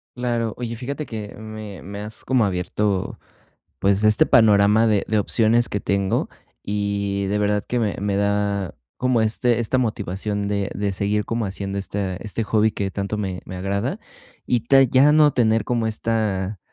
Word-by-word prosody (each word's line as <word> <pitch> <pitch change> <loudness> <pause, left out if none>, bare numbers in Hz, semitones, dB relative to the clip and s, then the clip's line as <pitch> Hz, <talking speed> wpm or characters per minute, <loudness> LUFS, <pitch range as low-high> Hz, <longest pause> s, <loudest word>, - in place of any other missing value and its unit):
Claro. 120 -3 -1
Oye, 115 -1 -4
fíjate 140 +5 -5
que 105 -3 -7
me 110 -2 -8
me 100 +1 -7
has 105 +1 -8
como 130 -3 +2
abierto, 95 +1 -2 0.6
pues 100 +1 +2
este 105 0 +6
panorama 105 0 +5
de 105 -3 +2
de 110 0 +2
opciones 115 +3 +2
que 105 - -2
tengo 100 -1 0 0.3
y 100 -1 -2
de 100 +2 0
verdad 105 0 0
que 125 - -1
me 110 -4 -1
me 100 0 -1
da 100 -2 0 0.2
como 125 -2 +2
este 120 +2 +1
esta 120 +3 0
motivación 105 -3 -2
de 100 -1 -1
de 100 -1 -1
seguir 100 +2 -1
como 115 -2 -2
haciendo 100 0 -4
esta 100 -1 -3
este 110 +3 -4
hobby 110 +1 +2
que 100 -1 -3
tanto 100 +2 -3
me 95 -3 -3
me 95 - -8
agrada 100 - -2 0.5
y 120 -2 +2
ta 135 +1 +6
ya 135 +3 +5
no 150 -2 +5
tener 115 -3 +2
como 120 -2 0
esta 105 -3 -1
105 Hz, 170 wpm, -22 LUFS, 100-115 Hz, 0.6 s, este